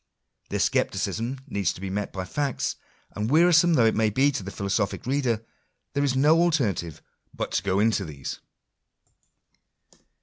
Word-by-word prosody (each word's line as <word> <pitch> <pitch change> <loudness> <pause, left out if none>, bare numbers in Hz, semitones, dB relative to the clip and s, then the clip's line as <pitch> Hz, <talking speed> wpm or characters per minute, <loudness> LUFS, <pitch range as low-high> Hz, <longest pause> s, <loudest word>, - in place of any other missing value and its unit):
Their - - -2
scepticism 125 +4 -1
needs 100 - -1
to - - -12
be 95 0 -5
met 100 +1 -3
by 95 -1 -5
facts; 140 +6 -2 0.4
and, 105 +2 -3
wearisome 170 +2 +5
though 120 -5 +4
it 110 - +4
may 110 0 +2
be 135 +7 +3
to 130 - -3
the 95 - -6
philosophic 100 +2 -2
reader, 125 -4 0 0.5
there 140 - +1
is 135 -2 +1
no 150 +5 +4
alternative 110 - 0 0.3
but - - -3
to - - 0
go 95 0 0
into 110 -1 +2
these. 70 -6 -7
115 Hz, 160 wpm, -25 LUFS, 100-140 Hz, 0.5 s, wearisome